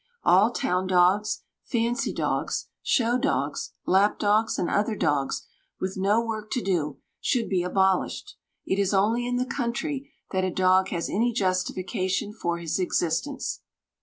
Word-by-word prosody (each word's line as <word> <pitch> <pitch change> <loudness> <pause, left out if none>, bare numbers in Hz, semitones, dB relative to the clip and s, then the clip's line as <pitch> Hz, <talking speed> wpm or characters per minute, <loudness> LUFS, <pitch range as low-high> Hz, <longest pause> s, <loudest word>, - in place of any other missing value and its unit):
All 195 +5 +5
town 185 -5 0
dogs, 185 +4 +3 0.2
fancy 240 +3 0
dogs, - - -2
show 240 0 +2
dogs, 280 +3 -1
lap 195 +3 +3
dogs, 215 +2 +2
and 175 - 0
other 210 +2 +1
dogs 145 -7 0 0.3
with 185 0 -3
no 205 +5 +2
work 215 -2 -4
to 250 - 0
do, 155 -7 -1 0.2
should 240 -3 0
be 185 -2 +1
abolished; 190 +1 0 0.3
it 190 - 0
is 200 0 +2
only 225 +5 +2
in 245 - -1
the 250 0 0
country 270 +3 -3 0.2
that 190 -1 0
a 185 - +1
dog 185 +1 +3
has 170 -2 -2
any 235 +4 +1
justification 185 -1 -1
for 175 -5 -2
his 170 +1 -2
existence. 180 - -1
195 Hz, 150 wpm, -26 LUFS, 185-230 Hz, 0.3 s, All